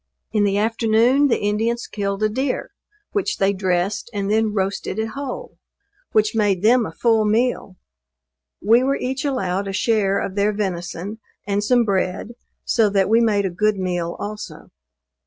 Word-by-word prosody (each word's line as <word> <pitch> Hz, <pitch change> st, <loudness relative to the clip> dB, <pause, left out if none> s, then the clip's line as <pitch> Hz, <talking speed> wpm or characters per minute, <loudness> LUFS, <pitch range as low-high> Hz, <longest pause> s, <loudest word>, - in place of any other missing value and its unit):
In 210 Hz, -2 st, +2 dB
the 200 Hz, 0 st, +1 dB
afternoon 230 Hz, +5 st, +3 dB
the 250 Hz, -, +2 dB
Indians 225 Hz, +3 st, -1 dB
killed 200 Hz, 0 st, -3 dB
a -, -, +4 dB
deer, 260 Hz, +4 st, -2 dB, 0.4 s
which 405 Hz, -3 st, -1 dB
they 195 Hz, +1 st, +2 dB
dressed, 190 Hz, +2 st, -1 dB
and 200 Hz, 0 st, -1 dB
then 220 Hz, 0 st, +2 dB
roasted 195 Hz, -1 st, -2 dB
it 220 Hz, 0 st, -1 dB
whole; 275 Hz, +1 st, -7 dB, 0.5 s
which 215 Hz, 0 st, +2 dB
made 205 Hz, -4 st, +1 dB
them 235 Hz, +1 st, +4 dB
a -, -, -8 dB
full 225 Hz, +5 st, +2 dB
meal. 215 Hz, -2 st, 0 dB, 0.9 s
We 225 Hz, +5 st, +5 dB
were 270 Hz, +2 st, +1 dB
each 260 Hz, +1 st, -3 dB
allowed 200 Hz, -8 st, -1 dB
a 195 Hz, -, -4 dB
share 200 Hz, -2 st, +1 dB
of 190 Hz, -, -3 dB
their 205 Hz, +1 st, +1 dB
venison, 190 Hz, +1 st, -4 dB, 0.3 s
and 205 Hz, 0 st, 0 dB
some 240 Hz, +2 st, +3 dB
bread, 190 Hz, 0 st, -1 dB, 0.4 s
so 225 Hz, -3 st, +3 dB
that 195 Hz, -1 st, +1 dB
we 225 Hz, +2 st, +4 dB
made 210 Hz, -3 st, +2 dB
a 190 Hz, -, -1 dB
good 210 Hz, +4 st, +1 dB
meal 175 Hz, -2 st, -2 dB
also. 210 Hz, +1 st, -7 dB
210 Hz, 165 wpm, -21 LUFS, 195-230 Hz, 0.9 s, We